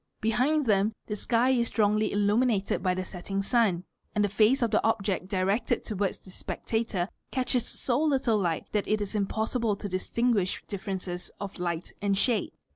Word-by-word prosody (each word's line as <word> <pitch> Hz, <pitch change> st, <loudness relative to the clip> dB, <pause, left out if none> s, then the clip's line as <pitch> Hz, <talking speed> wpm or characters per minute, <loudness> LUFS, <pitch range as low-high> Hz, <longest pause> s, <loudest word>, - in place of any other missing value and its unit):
Behind 255 Hz, +7 st, +2 dB
dl 225 Hz, -, +3 dB
em 200 Hz, +2 st, +2 dB
the 210 Hz, -, -3 dB
sky 240 Hz, +4 st, +2 dB
is 240 Hz, -2 st, +2 dB
strongly 215 Hz, -1 st, +2 dB
illuminated 205 Hz, 0 st, +2 dB
by 185 Hz, -1 st, +1 dB
the 185 Hz, 0 st, -3 dB
setting 195 Hz, +2 st, -4 dB
sun, 200 Hz, -5 st, +2 dB, 0.3 s
and 210 Hz, -, +3 dB
the -, -, -1 dB
face 220 Hz, +6 st, +3 dB
of 235 Hz, -, +2 dB
rt -, -, -12 dB
he -, -, +5 dB
object 200 Hz, -4 st, 0 dB
directed 195 Hz, +3 st, 0 dB
towards 205 Hz, -3 st, -1 dB
the 185 Hz, -, -15 dB
spectator 220 Hz, -2 st, -2 dB, 0.2 s
catches 255 Hz, -2 st, 0 dB
so 280 Hz, +5 st, 0 dB
httle 235 Hz, -6 st, +2 dB
light 170 Hz, -3 st, -1 dB
that 210 Hz, -2 st, 0 dB
it 215 Hz, 0 st, +2 dB
is 205 Hz, 0 st, -3 dB
ir 205 Hz, -2 st, +1 dB
possible 220 Hz, +1 st, 0 dB
to 205 Hz, -, -5 dB
distinguish 200 Hz, +1 st, 0 dB
differences 190 Hz, -3 st, -4 dB
of 200 Hz, -1 st, -5 dB
hght 175 Hz, -1 st, -3 dB
and 200 Hz, -1 st, +1 dB
shade. 225 Hz, -1 st, +2 dB
210 Hz, 185 wpm, -28 LUFS, 195-230 Hz, 0.3 s, he